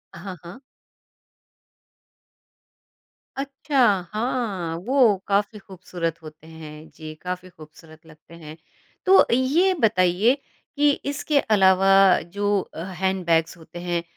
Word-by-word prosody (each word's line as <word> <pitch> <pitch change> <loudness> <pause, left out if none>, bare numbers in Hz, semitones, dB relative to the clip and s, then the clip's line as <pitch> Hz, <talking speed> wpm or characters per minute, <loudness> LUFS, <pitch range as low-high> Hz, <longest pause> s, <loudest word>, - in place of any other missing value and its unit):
हाँ, 185 +2 -8
हाँ। 175 +9 -11 2.8
अच्छा, 275 +1 -3 0.3
हाँ, 215 -7 -3
वो 245 -6 +3
काफ़ी 205 +1 -1
खूबसूरत 175 -4 -6
होते 155 0 -13
हैं 155 -1 -12
जी, 155 -1 -10
काफ़ी 180 0 -6
खूबसूरत 160 -1 -17
लगते 160 +1 -18
हैं। 155 -1 -12 0.5
तो 385 +1 +6
ये 300 +10 +2
बताइए 205 0 +2 0.4
कि 295 0 +3 0.2
इसके 285 +1 0
अलावा 195 -4 +3 0.3
जो 205 +4 -1
अ, 165 - -10
हैंडबैग्स 180 -3 -1
होते 170 +1 -12
हैं, 175 -1 -3
185 Hz, 105 wpm, -23 LUFS, 165-225 Hz, 2.8 s, तो